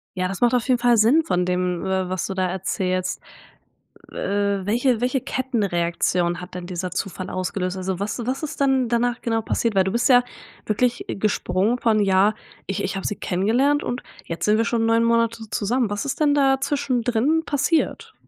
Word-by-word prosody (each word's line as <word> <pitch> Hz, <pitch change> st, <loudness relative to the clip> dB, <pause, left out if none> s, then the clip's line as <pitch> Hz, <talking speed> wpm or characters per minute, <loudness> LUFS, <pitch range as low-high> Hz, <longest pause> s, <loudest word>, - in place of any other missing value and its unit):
Ja, 185 Hz, 0 st, 0 dB
das 195 Hz, +3 st, -6 dB
macht 245 Hz, +1 st, +4 dB
auf 245 Hz, +2 st, 0 dB
jeden 250 Hz, -2 st, +3 dB
Fall 240 Hz, -1 st, +4 dB
Sinn 245 Hz, +10 st, +5 dB
von 180 Hz, -, 0 dB
dem, 180 Hz, 0 st, -1 dB
äh, 190 Hz, -1 st, -1 dB
was 185 Hz, -2 st, -2 dB
du 195 Hz, -, -4 dB
da 185 Hz, -1 st, 0 dB
erzählst. 185 Hz, 0 st, -2 dB, 0.9 s
Äh, 200 Hz, -1 st, -1 dB
welche 240 Hz, +2 st, +1 dB
welche 255 Hz, +1 st, +1 dB
Kettenreaktion 180 Hz, -8 st, -1 dB
hat 180 Hz, 0 st, -10 dB
denn 180 Hz, -, -6 dB
dieser 180 Hz, 0 st, -4 dB
Zufall 185 Hz, 0 st, -4 dB
ausgelöst? 185 Hz, 0 st, -3 dB
Also 185 Hz, 0 st, -3 dB
was 210 Hz, +4 st, -3 dB
was 265 Hz, +4 st, -2 dB
ist 295 Hz, -, -5 dB
denn 265 Hz, -3 st, +2 dB
danach 240 Hz, +1 st, 0 dB
genau 225 Hz, -1 st, -1 dB
passiert, 225 Hz, 0 st, -1 dB
weil 190 Hz, -1 st, +4 dB
du 190 Hz, -, -2 dB
bist 235 Hz, +1 st, +1 dB
ja 245 Hz, -2 st, +6 dB, 0.4 s
wirklich, 240 Hz, +3 st, 0 dB
äh, -, -, -3 dB
gesprungen 200 Hz, +2 st, 0 dB
von: 220 Hz, -3 st, +2 dB
„Ja, 195 Hz, +1 st, +4 dB, 0.3 s
ich 195 Hz, +1 st, -2 dB
ich 195 Hz, 0 st, -3 dB
habe 195 Hz, -, -3 dB
sie 210 Hz, -, -2 dB
kennengelernt 245 Hz, +11 st, +1 dB
und 245 Hz, -, -3 dB, 0.2 s
jetzt 165 Hz, +4 st, -4 dB
sind 210 Hz, +1 st, +4 dB
wir 225 Hz, -, +2 dB
schon 230 Hz, -1 st, 0 dB
9 230 Hz, 0 st, +3 dB
Monate 230 Hz, -1 st, +1 dB
zusammen.“ 225 Hz, +2 st, 0 dB
Was 205 Hz, +6 st, -3 dB
ist 280 Hz, -, -3 dB
denn 295 Hz, -1 st, +4 dB
da 270 Hz, -2 st, +3 dB
zwischendrin 265 Hz, +1 st, +1 dB
passiert? 295 Hz, +3 st, 0 dB
215 Hz, 195 wpm, -22 LUFS, 185-245 Hz, 0.9 s, ja